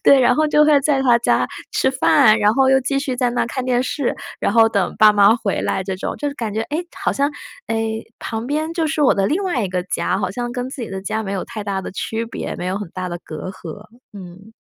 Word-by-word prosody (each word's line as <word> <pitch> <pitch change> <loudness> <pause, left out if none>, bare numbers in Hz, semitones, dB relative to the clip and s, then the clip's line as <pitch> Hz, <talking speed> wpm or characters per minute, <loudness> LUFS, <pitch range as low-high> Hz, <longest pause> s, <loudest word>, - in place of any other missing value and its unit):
“对， 275 - +7
然 245 0 +4
后 310 - +3
就 300 0 +4
会 300 -1 +5
在 280 -1 +2
她 245 -3 +5
家 - - +2 0.2
吃 265 - +2
饭， 260 -4 +4
然 210 0 +3
后 270 0 +3
又 265 - +5
继 275 +2 -1
续 275 -2 -3
在 250 -1 +1
那 245 - -1
儿 - - -1
看 255 +2 -4
电 250 -1 +1
视， 260 0 -2 0.2
然 - - 0
后 225 0 +6
等 200 -4 -1
爸 215 -1 +7
妈 205 +2 +6
回 215 -5 -2
来 190 - -1
这 190 0 -4
种。 190 - -4
就 290 - -1
是 280 - -6
感 225 -6 -4
觉， 220 - -2
哎， 290 +7 -4 0.3
好 - - +2
像， 280 +1 0 0.4
哎， 225 0 -2 0.2
旁 225 +1 -4
边 310 +4 -2
就 330 -2 0
是 310 0 -2
我 275 - +5
的 195 -1 +1
另 330 - 0
外 285 - 0
一 - - -2
个 180 0 -2
家， 185 0 -1
好 190 - -2
像 240 +4 -4
跟 245 +1 -3
自 265 -1 -7
己 230 - -6
的 190 0 -4
家 220 +3 -3
没 195 -2 -4
有 195 - -2
太 220 -3 -6
大 195 -2 -2
的 - - -7
区 225 +4 -3
别， - - -5
没 180 - -5
有 185 +1 -1
很 205 0 -5
大 185 0 -5
的 175 0 -5
隔 155 +4 -7
阂。 185 0 -9 0.3
嗯。 195 +2 -12
225 Hz, 290 characters per minute, -20 LUFS, 200-265 Hz, 0.4 s, 对